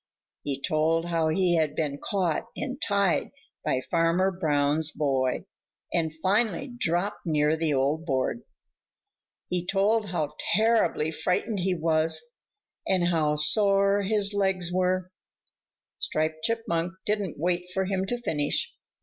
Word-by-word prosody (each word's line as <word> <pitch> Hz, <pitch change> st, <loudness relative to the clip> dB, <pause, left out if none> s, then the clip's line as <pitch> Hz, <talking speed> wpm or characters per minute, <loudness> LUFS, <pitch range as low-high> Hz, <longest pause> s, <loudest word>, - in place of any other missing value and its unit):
He 140 Hz, -2 st, -3 dB
told 155 Hz, +3 st, +1 dB
how 165 Hz, -2 st, 0 dB
he 175 Hz, +1 st, +2 dB
had 155 Hz, -2 st, 0 dB
been 145 Hz, -3 st, -2 dB
caught 185 Hz, -1 st, -1 dB
and 270 Hz, 0 st, -5 dB
tied 200 Hz, -4 st, +1 dB, 0.3 s
by 130 Hz, -, 0 dB
Farmer 170 Hz, +5 st, +1 dB
Brown's 150 Hz, -3 st, +1 dB
boy 135 Hz, -4 st, 0 dB, 0.5 s
and 160 Hz, -2 st, +1 dB
finally 215 Hz, +5 st, +1 dB
dropped 175 Hz, -1 st, -1 dB
near 150 Hz, -2 st, +2 dB
the 160 Hz, -2 st, 0 dB
old 140 Hz, +4 st, 0 dB
board. 135 Hz, -, -1 dB, 1.1 s
He 180 Hz, -1 st, -1 dB
told 205 Hz, +4 st, +1 dB
how 155 Hz, -5 st, -2 dB, 0.2 s
terribly 215 Hz, -8 st, +2 dB
frightened 180 Hz, +6 st, -1 dB
he 185 Hz, 0 st, 0 dB
was, 160 Hz, -1 st, +2 dB, 0.7 s
and 180 Hz, -2 st, +2 dB
how 155 Hz, -3 st, +1 dB
sore 200 Hz, +5 st, +4 dB
his 205 Hz, 0 st, +2 dB
legs 190 Hz, -3 st, 0 dB
were. 185 Hz, 0 st, 0 dB, 0.9 s
Striped 155 Hz, 0 st, -2 dB
Chipmunk 190 Hz, -7 st, -1 dB
didn't 205 Hz, -5 st, -2 dB
wait 175 Hz, +3 st, -1 dB
for 190 Hz, +1 st, -1 dB
him 190 Hz, 0 st, -1 dB
to 245 Hz, -, -1 dB
finish. 150 Hz, -10 st, -1 dB
175 Hz, 130 wpm, -27 LUFS, 155-195 Hz, 1.1 s, sore